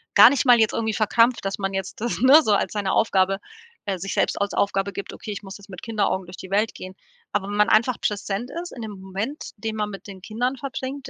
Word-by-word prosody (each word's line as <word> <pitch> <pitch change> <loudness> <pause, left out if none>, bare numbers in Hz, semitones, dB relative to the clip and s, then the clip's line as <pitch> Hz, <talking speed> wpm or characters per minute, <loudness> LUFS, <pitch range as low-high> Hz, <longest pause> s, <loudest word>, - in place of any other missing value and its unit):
gar - - +10
nicht 280 - +1
mal 245 -2 +7
jetzt 220 -1 +3
irgendwie 220 -1 -1
verkrampft, 230 +2 +3
dass 195 +1 -2
man 195 -1 -2
jetzt 190 +2 -5
das, 240 +1 -2
ne, 275 +5 +8
so 215 - +2
als 200 - 0
seine 200 -2 -1
Aufgabe 195 -2 +2 0.5
äh, 190 -3 -1
sich 195 +2 -4
selbst - - 0
als 200 - -1
Aufgabe 200 0 0
gibt: 200 - -6
„Okay, 215 - -7
ich 205 - -6
muss 195 0 -9
jetzt 200 +1 -16
mit 185 -2 -9
Kinderaugen 205 -4 -1
durch 180 +1 -11
die 190 - -9
Welt 210 +3 +1
gehen“. 185 0 -9 0.4
Aber 200 -1 -1
wenn 205 - -3
man 210 +2 +4
einfach 230 +3 +3
präsent 210 +3 -2
ist 355 - -9
in 240 - -8
dem 215 -2 -6
Moment, 200 +10 -5
den 220 +1 -4
man 210 -1 -2
mit 195 - -9
den 195 -2 -10
Kindern 245 +5 -2
verbringt, 265 +1 -5
210 Hz, 250 wpm, -23 LUFS, 195-230 Hz, 0.5 s, gar